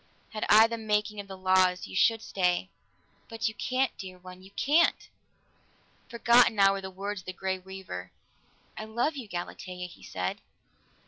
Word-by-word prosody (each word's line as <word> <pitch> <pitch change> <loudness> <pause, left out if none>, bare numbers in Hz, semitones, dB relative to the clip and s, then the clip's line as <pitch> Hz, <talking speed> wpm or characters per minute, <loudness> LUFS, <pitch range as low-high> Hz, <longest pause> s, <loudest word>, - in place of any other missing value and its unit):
"Had 215 - -3
I 215 +2 +8
the 230 0 -3
making 210 -1 0
of 200 - -7
the 190 -1 -8
laws, 185 -1 +3
you 95 - -9
should 225 - +3
stay. 180 0 0 0.6
But 225 0 -2
you 220 - -2
can't, 255 +3 -1
dear 185 -1 -8
one. 180 0 -12
You 190 - -14
can't!" 295 +11 +2 1.0
Forgotten 235 0 +5
now 195 -1 +6
were 195 0 -3
the 190 - -6
words 195 +1 -5
of - - -25
the 185 - -4
Grey 190 0 -2
Weaver. 185 - -8 0.6
"I 215 - -6
love 235 +8 -1
you, 255 -6 -7
Galatea," 180 0 -6
he 180 - -13
said. 90 0 -4
195 Hz, 175 wpm, -28 LUFS, 185-225 Hz, 1.0 s, I